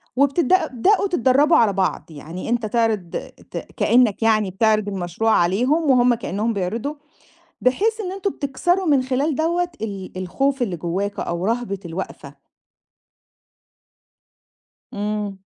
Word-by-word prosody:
وبتبدأ 285 +5 +3
تبدأوا 395 - +2
تتدربوا 280 -3 +3
على 220 -4 +4
بعض، 190 -1 -1
يعني 160 +7 -8
أنت 235 -1 0
تعرض 215 -5 0 0.4
ت - - -5 0.2
كأنّك 235 -3 +3
يعني 215 -3 +2
بتعرض 215 +1 +2
المشروع 195 +3 -1
عليهم، 250 - +2
وهم 250 -2 +5
كأنّهم 225 0 -2
بيعرضوا، 220 +9 -3 0.7
بحيث 420 - +1
إن 375 -3 -4
أنتم 395 0 -2
بتكسروا 350 +7 -1
من 280 -4 +4
خلال 270 +4 0
دوَّة 340 +4 0
ال 200 -4 -5
الخوف 265 +9 -1
اللي 190 -7 -1
جوّاك 185 +5 -3
أو 170 +2 -2
رهبة 230 -3 -1
الوقفة. 175 +3 -7 2.5
إمم. 205 -1 -3
230 Hz, 125 wpm, -21 LUFS, 195-280 Hz, 2.5 s, وهم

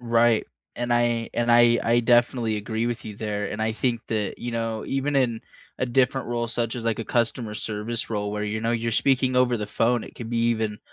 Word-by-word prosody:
Right. 115 -1 +3 0.3
And 120 0 -1
I 120 -1 +1
and 120 0 +2
I 120 0 +6
I 120 +1 +3
definitely 120 -2 +2
agree 110 +2 -2
with 120 -1 -3
you 105 -2 -7
there, 105 -1 -3
and 110 +1 -4
I 110 - +1
think 115 +1 -1
that, 105 -3 -1
you 120 - -4
know, 115 -2 -3
even 135 +2 -1
in 120 -4 +1 0.4
a 130 - 0
different 130 +1 +1
role 120 -1 -1
such 115 0 -1
as, 115 - -5
like, 115 -2 0
a - - -4
customer 115 -2 -1
service 110 +2 -3
role 105 -2 -2
where, 105 0 -2
you 105 +1 -2
know, 115 +1 0
you're 115 0 -1
speaking 130 +1 +2
over 125 -1 +3
the 105 - -4
phone, 120 +2 +1
it - - -12
could 115 -1 -7
be 120 - -1
even, 110 -2 -1
115 Hz, 225 wpm, -25 LUFS, 110-120 Hz, 0.4 s, I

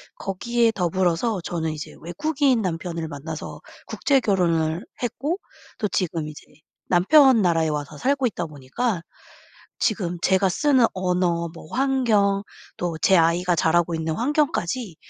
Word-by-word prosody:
거기에 230 +4 0
더불어서 185 +2 0
저는 160 -2 -2
이제 150 -1 -8
외국인 265 - 0
남편을 170 -3 -3
만나서 155 +1 -7 0.2
국제 275 -2 +1
결혼을 170 -6 +1 0.2
했고 280 - -2 0.4
또 215 - -1
지금 170 -5 -2
이제 150 -1 -9 0.5
남편 255 - +5
나라에 165 -3 +2
와서 150 0 -4
살고 275 0 +1
있다 175 -8 -2
보니까 165 - -3 0.8
지금 180 -6 -1
제가 190 +2 +2
쓰는 270 +3 +3
언어 180 -2 0
뭐 165 - -11
환경 230 -7 +2 0.3
또 175 -2 -3
제 190 - +5
아이가 175 +2 +3
자라고 170 +1 +2
있는 160 0 -2
환경까지 250 - -1
180 Hz, 280 characters per minute, -23 LUFS, 165-235 Hz, 0.8 s, 남편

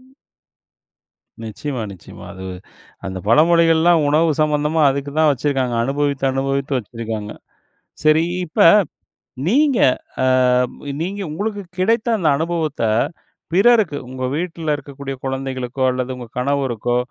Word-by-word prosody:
ம். 260 +1 -23 1.3
நிச்சயமா, 120 +3 -5
நிச்சயமா. 90 - -13
அது 95 -1 -9 0.6
அந்த 95 -1 -5
பழமொழிகள்லாம் 165 +3 +4
உணவு 155 +2 +3
சம்மந்தமா 150 +1 +1
அதுக்குதான் 145 +3 +1
வச்சிருக்காங்க. 135 -2 -1
அனுபவித்து, 140 +1 -1
அனுபவித்து 135 +1 -2
வச்சிருக்காங்க. 110 -2 -6 0.7
சரி 155 +1 +5 0.2
இப்ப 160 - -3 0.9
நீங்க 275 +5 +3 0.4
அ - - +3 0.8
நீங்க 195 +4 -3
உங்களுக்கு 205 +4 -3 0.2
கிடைத்த 220 +5 +1
அந்த 170 - 0
அனுபவத்த, 160 -4 -2 0.7
பிறருக்கு 200 -5 +4
உங்க 130 0 -6
வீட்ல 165 -2 -2
இருக்கக்கூடிய 140 -1 -7
குழந்தைகளுக்கோ 130 -1 -3
அல்லது 125 0 -3
உங்கள் 120 -2 -10
கணவருக்கோ, 125 -3 0
145 Hz, 105 wpm, -19 LUFS, 130-165 Hz, 1.3 s, சரி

